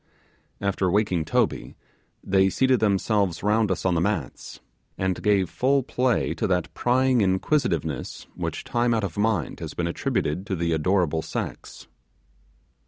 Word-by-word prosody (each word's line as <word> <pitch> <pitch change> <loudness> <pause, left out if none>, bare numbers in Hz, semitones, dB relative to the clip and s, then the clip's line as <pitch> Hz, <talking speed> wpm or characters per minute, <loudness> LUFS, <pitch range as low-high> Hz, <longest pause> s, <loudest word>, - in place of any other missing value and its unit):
After 100 -2 0
waking 95 -4 +1
Toby, - - -1 0.5
they 95 0 +3
seated 130 +4 +2
themselves 100 -3 +1
round 105 +1 +2
us 95 -2 -2
on 90 - +3
the 85 - +1
mats, 100 -1 -3 0.4
and 95 -1 -1
gave 100 -3 +2
full 135 +8 +1
play 125 -1 0
to - - -2
that 90 -2 -1
prying 130 0 +2
inquisitiveness 95 - -1
which - - -4
time 120 0 +1
out 110 - -1
of 95 -5 -4
mind 110 +1 0
has 80 -3 -7
been 85 - -1
attributed 85 +1 -2
to 95 - -1
the 85 -1 0
adorable 80 0 +1
sex. 80 - -6
95 Hz, 145 wpm, -25 LUFS, 85-110 Hz, 0.5 s, they